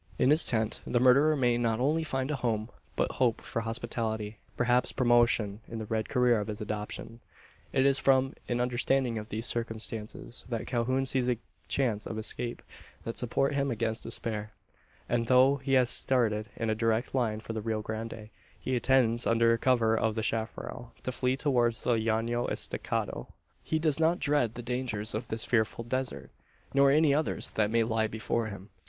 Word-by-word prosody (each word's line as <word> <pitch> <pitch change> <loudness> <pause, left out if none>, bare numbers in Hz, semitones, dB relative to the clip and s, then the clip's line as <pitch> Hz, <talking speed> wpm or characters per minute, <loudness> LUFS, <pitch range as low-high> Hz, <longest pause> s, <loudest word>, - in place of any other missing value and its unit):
In 130 - +4
his 155 +2 +5
tent, 110 -2 -1
the 120 - +2
murderer 135 +5 +5
may 120 -3 +2
not 115 -1 0
only 150 +5 +1
find 135 -2 -2
a - - 0
home, 115 -3 -1 0.3
but - - 0
hope 120 -4 +1
for 115 - -4
hospitality 115 -2 -3 0.2
perhaps 125 0 +2
promotion, 120 -4 +2
in 115 - -6
the 110 - -4
red 110 0 -2
career 125 -3 +3
of 105 - -4
his 105 -1 -5
adoption! 105 +2 -5 0.5
It 135 0 +2
is 140 -1 +5
from 135 0 +3 0.2
an 120 0 0
understanding 125 -1 +1
of 105 +1 -9
these 110 +2 -3
circumstances, 115 0 -4
that 115 -3 -3
Calhoun 130 +2 0
sees 130 -1 +1
a 120 - +1 0.3
chance 115 -6 0
of 110 - -5
escape, 120 +2 -2 0.4
that 115 - -4
support 135 +4 0
him 140 0 0
against 115 -1 -2
despair; 105 -1 -4 0.5
and, 115 -1 0
though 130 +3 +5
he 135 0 -3
has 125 -2 +4
started 110 -4 +1
in 115 -1 -1
a - - +2
direct 115 +2 0
line 115 -5 0
for 115 - -7
the 110 - -3
Rio 110 0 -2
Grande, 110 0 -6 0.3
he 130 - -3
intends, 120 -2 +2
under 115 0 +4
cover 115 -2 +2
of 110 -1 0
the 110 - -2
chapparal, 115 +2 -4
to 130 - -2
flee 130 +1 0
towards 120 -5 +1
the 120 - +2
Llano 115 +2 0
Estacado. - - -3 0.4
He 160 - 0
does 155 -2 +1
not 165 +2 +3
dread 140 -6 +1
the 120 - -6
dangers 120 -3 -2
of 110 +2 -3
this 110 0 0
frightful 115 0 0
desert; 130 +2 -3 0.4
nor 140 0 +5
any 150 0 +4
others 155 +2 0
that 105 -1 +1
may 115 +1 +3
lie 110 -1 0
before 110 +1 -2
him. 100 -1 -9
120 Hz, 185 wpm, -29 LUFS, 110-130 Hz, 0.5 s, his